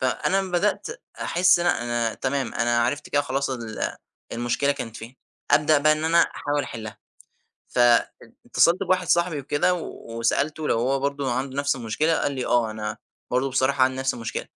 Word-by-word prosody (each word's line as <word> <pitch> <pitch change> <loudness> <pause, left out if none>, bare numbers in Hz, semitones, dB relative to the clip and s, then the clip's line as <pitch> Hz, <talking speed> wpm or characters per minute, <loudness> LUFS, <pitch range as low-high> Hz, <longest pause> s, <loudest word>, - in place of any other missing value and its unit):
فأنا 130 +8 +1
أما 190 - -5
بدأت 200 +4 +1 0.3
أحس 180 0 +4
إن 175 - -1
أنا 175 - +1
أنا 120 -1 -1
تمام، 135 -1 -2
أنا 120 0 +1
عرِفت 145 +5 -2
كده 145 0 +1
خلاص 140 0 -2
ال 115 -4 -4 0.4
المشكلة 125 +4 0
كانت 115 -5 -7
فين، 120 +4 -10 0.3
أبدأ 150 0 +4
بقى 155 +1 +4
إن 155 +1 -2
أنا 165 +1 +3
أحاول 145 -2 -1
أحلّها، 110 -2 -8 0.7
فاتصلت 125 +8 +2
بواحد 185 -1 +1
صاحبي 170 -3 +2
وكده 145 +6 +1
وسألته 145 +1 -2
لو 115 - +2
هو 135 +3 0
برضو 140 -1 -2
عنده 130 +2 -3
نفس 140 -1 +1
المشكلة، 140 +7 0
قال 145 - -1
لي 130 -2 -3
آه 120 -2 +2
أنا 110 0 -5 0.3
برضو 130 +2 0
بصراحة 130 0 +2
عندي 130 0 -1
نفس 130 0 0
المشكلة. 115 -3 -5
135 Hz, 175 wpm, -24 LUFS, 120-155 Hz, 0.7 s, أحس